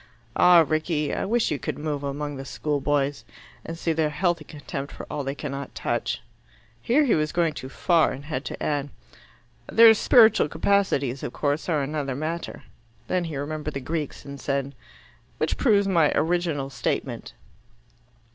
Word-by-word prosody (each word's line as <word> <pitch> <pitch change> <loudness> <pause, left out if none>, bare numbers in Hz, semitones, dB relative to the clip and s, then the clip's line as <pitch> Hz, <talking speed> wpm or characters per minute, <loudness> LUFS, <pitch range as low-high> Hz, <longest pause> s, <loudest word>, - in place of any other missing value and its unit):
Ah, 175 -2 +7
Rickie! 155 -2 0
I - - -1
wish 230 +3 +1
you 145 - -1
could - - -4
move 150 -1 -3
among 145 +1 -3
the 135 - -6
school 145 +1 -2
boys, 145 0 0 0.4
and 165 - -6
see 165 -1 0
their 155 -1 +1
healthy 170 +1 0
contempt 145 -2 -7
for - - -8
all 145 - -3
they 135 +1 -3
cannot 140 -1 -6
touch!" 120 -1 -2 0.6
Here 255 - +3
he 250 - +3
was 155 0 +1
going 170 -3 +1
too 130 -2 -7
far, 165 +4 +2
and 140 +2 -8
had 140 -3 -3
to - - -5
add, 145 -1 -1 0.8
"Their 225 0 +8
spiritual 220 0 +5
capacities, 140 -10 +1
of - - -5
course, 145 +4 -1
are 150 -4 +1
another 140 -2 -3
matter." 160 +4 -4 0.4
Then 180 -1 0
he 160 -4 -5
remembered 150 +1 -4
the - - -1
Greeks, 150 +2 -4
and 140 -1 -8
said, 140 0 -2 0.6
"Which 155 - 0
proves 205 -6 +3
my 165 -6 +3
original 160 -5 0
statement." 135 - -3
150 Hz, 165 wpm, -25 LUFS, 140-170 Hz, 0.8 s, Their